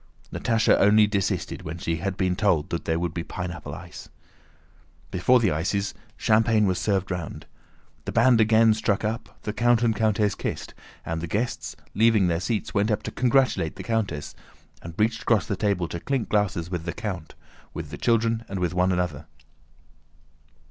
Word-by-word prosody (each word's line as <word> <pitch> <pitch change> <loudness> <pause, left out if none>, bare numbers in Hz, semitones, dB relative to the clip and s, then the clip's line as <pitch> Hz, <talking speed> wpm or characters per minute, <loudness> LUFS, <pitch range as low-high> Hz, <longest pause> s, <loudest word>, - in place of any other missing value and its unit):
Natásha 115 -2 +2
only 105 +2 +6
desisted 100 -2 -2
when 80 +2 -6
she 85 -1 -2
had 95 +3 -3
been 90 -2 +1
told 90 -6 +1
that 85 - -3
there 80 0 0
would 85 -1 -2
be 85 - -3
pineapple 90 -3 -6
ice. - - -10 1.0
Before 125 +8 +4
the 105 -6 +2
ices, 95 +6 -1 0.2
champagne 110 0 +3
was 95 -2 +1
served 95 -2 0
round. 85 -4 -5 0.6
The - - -3
band 115 0 +5
again 110 0 +5
struck 105 -2 0
up, 110 +2 -4
the 105 - -3
count 120 +1 +3
and 115 -2 +2
countess 105 -1 +1
kissed, - - -5 0.3
and 80 0 -3
the 85 - -4
guests, 110 +8 -2 0.2
leaving 110 -3 +4
their 85 -1 0
seats, 105 +3 -2
went 105 +1 +2
up 105 - 0
to - - -5
"congratulate" 125 - +2
the - - -7
countess, 105 -10 -2 0.5
and 85 -1 -9
reached 110 +1 +1
across 110 -5 +2
the 100 - -2
table 95 -4 0
to 85 - -4
clink 135 +3 -2
glasses 95 -5 0
with 85 -3 -3
the 85 - -3
count, 95 -9 -6 0.4
with - - -7
the - - -6
children, 115 0 +1
and 100 - -4
with 90 -1 -1
one 90 +1 +2
another. 85 -5 -2
100 Hz, 175 wpm, -25 LUFS, 90-110 Hz, 1.0 s, only